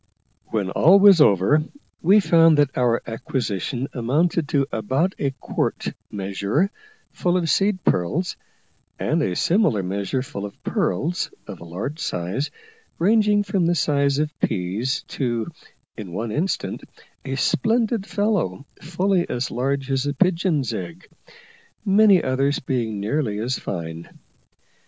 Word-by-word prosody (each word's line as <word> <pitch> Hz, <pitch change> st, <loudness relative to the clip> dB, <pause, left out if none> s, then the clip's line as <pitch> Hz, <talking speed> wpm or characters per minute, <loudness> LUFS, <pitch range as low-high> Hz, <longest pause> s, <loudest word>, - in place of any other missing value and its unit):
When 100 Hz, -4 st, -2 dB
all 180 Hz, -, +6 dB
was 195 Hz, -4 st, +7 dB
over 105 Hz, -, +4 dB, 0.4 s
we 195 Hz, +5 st, +6 dB
found 165 Hz, -4 st, +5 dB
that 145 Hz, -2 st, +2 dB
our 120 Hz, -2 st, +1 dB
acquisition 120 Hz, +2 st, -3 dB
amounted 145 Hz, +6 st, 0 dB
to 140 Hz, -2 st, +2 dB
about 130 Hz, -, 0 dB
a 140 Hz, -, +1 dB
quart -, -, -2 dB, 0.2 s
measure 100 Hz, -, -1 dB, 0.4 s
full 180 Hz, 0 st, 0 dB
of 170 Hz, -2 st, -1 dB
seed 195 Hz, -2 st, +1 dB
pearls, 150 Hz, -, 0 dB, 0.6 s
and -, -, 0 dB
a 90 Hz, -, -1 dB
similar 170 Hz, -, +2 dB
measure 100 Hz, +7 st, -2 dB
full 100 Hz, -6 st, -7 dB
of 105 Hz, -, -9 dB
pearls, 165 Hz, -, -1 dB, 0.2 s
of -, -, -9 dB
a 85 Hz, -, -10 dB
large 100 Hz, -, -5 dB
size, 95 Hz, -, -2 dB, 0.5 s
ranging 210 Hz, +2 st, +3 dB
from 195 Hz, -4 st, 0 dB
the 175 Hz, -, +2 dB
size 140 Hz, -3 st, +1 dB
of 150 Hz, 0 st, 0 dB
peas 110 Hz, -, -1 dB
to, 120 Hz, -4 st, -2 dB, 0.5 s
in 105 Hz, -6 st, -8 dB
one 110 Hz, +4 st, -3 dB
instance, 165 Hz, -, -2 dB, 0.4 s
a 135 Hz, -, -3 dB
splendid 225 Hz, -, +1 dB
fellow 200 Hz, -, -1 dB, 0.2 s
fully 180 Hz, +2 st, 0 dB
as 125 Hz, +1 st, -2 dB
large 135 Hz, +2 st, -1 dB
as 135 Hz, +1 st, 0 dB
a 145 Hz, -, -2 dB
pigeon's 165 Hz, -6 st, +1 dB
egg, 90 Hz, -5 st, -7 dB, 0.8 s
many 200 Hz, -2 st, +5 dB
others 135 Hz, +2 st, +1 dB
being 115 Hz, -5 st, -2 dB
nearly 105 Hz, +1 st, -1 dB
as 120 Hz, +4 st, -2 dB
fine. 85 Hz, -2 st, -6 dB
140 Hz, 135 wpm, -22 LUFS, 110-175 Hz, 0.8 s, was